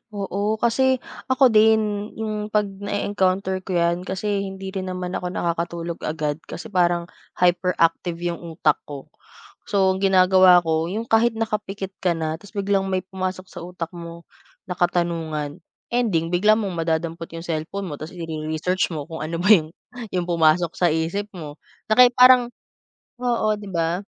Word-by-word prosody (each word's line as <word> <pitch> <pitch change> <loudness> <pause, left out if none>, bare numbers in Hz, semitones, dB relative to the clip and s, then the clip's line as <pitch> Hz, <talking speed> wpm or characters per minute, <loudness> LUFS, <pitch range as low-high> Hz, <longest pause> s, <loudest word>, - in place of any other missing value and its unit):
Oo, 200 +2 -1
kasi, 255 +3 +1 0.2
ako 260 -1 +4
din, 215 -1 +3
yung 215 -1 -3
'pag 210 0 +2
na-eencounter 195 -1 -1
ko 185 0 -5
yan, 170 +1 +1
kasi 200 +2 -1
hindi 190 0 -7
rin 190 -1 -4
naman 180 -1 -4
ako 180 - -3
nakakatulog 170 -1 -3
agad, 155 -1 -3
kasi 215 +4 -8
parang, 175 -2 +2 0.3
hyperactive 175 -1 +1
yung 170 -1 -2
utak 160 -3 0
ko. 140 -2 -9 0.6
So 195 -2 +3
ang - - -5
ginagawa 185 -1 +6
ko 160 0 0
yung 220 +3 -2
kahit 225 0 +3
nakapikit 210 -3 -3
ka 175 -2 +2
na, 160 -1 -2
tapos 205 +2 -16
biglang 200 -1 0
may 185 0 0
pumasok 185 0 -5
sa - - -8
utak 175 -2 -6
mo 170 0 -9 0.4
na 180 - -4
katanungan, 165 -3 -1 0.3
ending 200 -10 +1
bigla 210 +5 +4
mong 210 -3 -2
madadampot 165 0 -2
yung 165 - -6
cellphone 165 +5 -3
mo, 145 - -5
tapos 160 +4 -8
i-re-research 160 +2 -2
mo 150 - -3
kung 160 - -6
ano 165 +2 -4
ba 195 - +2
yung 160 -6 +5 0.4
yung 180 -1 0
pumasok 165 0 +3
sa 175 - +2
isip 165 +6 -1
mo. 150 -4 -8 0.4
Na 215 - +5
kaya 250 - +10
parang 250 -1 +7 0.7
oo, 240 -3 0
'di 205 -1 -9
ba? 170 +2 0
185 Hz, 160 wpm, -22 LUFS, 165-205 Hz, 0.7 s, kaya